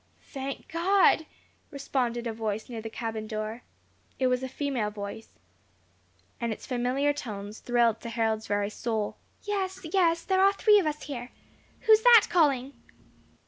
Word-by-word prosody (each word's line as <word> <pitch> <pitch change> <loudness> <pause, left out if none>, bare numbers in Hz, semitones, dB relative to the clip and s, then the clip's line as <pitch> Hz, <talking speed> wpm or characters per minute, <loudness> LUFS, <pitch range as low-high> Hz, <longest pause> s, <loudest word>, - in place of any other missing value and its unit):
"Thank 275 -1 -5
God!" 340 -1 +3 0.4
responded 245 -4 -2
a 230 - -2
voice 220 -1 -3
near 230 -2 -5
the 225 - -6
cabin 220 -1 -5
door. 215 +2 -4 0.6
It 260 - 0
was 250 0 +2
a 260 - -4
female 265 -6 -2
voice, 205 +1 -8 1.0
and 235 -1 -2
its 220 - -6
familiar 255 +3 0
tones 210 -6 -7
thrilled 235 -2 +1
to 235 - -6
Harold's 220 -1 -1
very 205 0 0
soul. 220 -2 -3 0.3
"Yes, 380 -3 -3
yes, 335 -3 +3
there 380 -1 +2
are 395 +1 +5
three 420 +1 +5
of 355 - 0
us 300 0 -3
here. 250 -4 -6 0.5
Who 445 - +2
is 435 0 +8
that 470 -3 +8
calling?" 280 -6 +2
250 Hz, 155 wpm, -28 LUFS, 220-325 Hz, 1.0 s, is